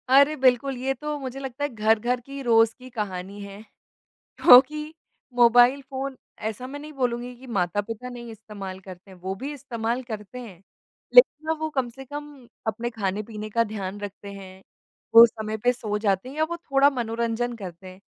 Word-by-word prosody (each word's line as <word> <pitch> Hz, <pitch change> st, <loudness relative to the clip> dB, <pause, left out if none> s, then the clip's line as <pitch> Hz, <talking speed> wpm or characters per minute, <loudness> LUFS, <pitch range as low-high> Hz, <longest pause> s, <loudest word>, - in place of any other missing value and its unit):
अरे 280 Hz, +3 st, +6 dB
बिल्कुल, 260 Hz, 0 st, +2 dB
ये 265 Hz, +2 st, -1 dB
तो 300 Hz, +3 st, -4 dB
मुझे 265 Hz, -1 st, -6 dB
लगता 270 Hz, +1 st, -5 dB
है 290 Hz, -, 0 dB
घर-घर 225 Hz, +3 st, +2 dB
की 275 Hz, +3 st, -8 dB
रोज़ 225 Hz, -2 st, +4 dB
की 255 Hz, 0 st, -11 dB
कहानी 200 Hz, -3 st, -5 dB
है। 200 Hz, +1 st, -9 dB, 0.8 s
क्योंकि 300 Hz, +5 st, +7 dB, 0.4 s
मोबाइल 245 Hz, +3 st, +6 dB
फ़ोन 270 Hz, 0 st, -4 dB, 0.3 s
ऐसा 235 Hz, +4 st, -5 dB
मैं 285 Hz, +2 st, -7 dB
नहीं 305 Hz, +1 st, -10 dB
बोलूँगी 245 Hz, -2 st, -2 dB
कि 255 Hz, +2 st, -14 dB
माता-पिता 210 Hz, +3 st, -2 dB
नहीं 240 Hz, -1 st, -8 dB
इस्तेमाल 205 Hz, -4 st, -8 dB
करते 190 Hz, 0 st, -12 dB
हैं 185 Hz, -, -14 dB
वो 190 Hz, +2 st, -4 dB
भी 275 Hz, +9 st, -5 dB
इस्तेमाल 240 Hz, -3 st, -3 dB
करते 220 Hz, 0 st, -7 dB
हैं। 200 Hz, -8 st, -11 dB, 0.5 s
लेकिन 315 Hz, -11 st, +6 dB
ना 320 Hz, -, +2 dB
वो 315 Hz, 0 st, -2 dB
कम 265 Hz, -5 st, -1 dB
से 270 Hz, +3 st, -11 dB
कम 290 Hz, -2 st, -9 dB, 0.2 s
अपने 230 Hz, +2 st, -2 dB
खाने-पीने 215 Hz, 0 st, -4 dB
का 230 Hz, +2 st, +2 dB
ध्यान 205 Hz, -2 st, -5 dB
रखते 205 Hz, 0 st, -8 dB
हैं, 190 Hz, -1 st, -11 dB, 0.5 s
वो 230 Hz, +1 st, +12 dB
समय 220 Hz, -1 st, -4 dB
पे 245 Hz, +3 st, +2 dB
सो 215 Hz, -4 st, -3 dB
जाते 205 Hz, +2 st, 0 dB
हैं 275 Hz, -, -10 dB
या 310 Hz, -, +1 dB
वो 340 Hz, -, -3 dB
थोड़ा 275 Hz, -4 st, +3 dB
मनोरंजन 235 Hz, -1 st, -2 dB
करते 185 Hz, -3 st, -9 dB
हैं। 185 Hz, 0 st, -12 dB
235 Hz, 180 wpm, -25 LUFS, 210-265 Hz, 0.8 s, वो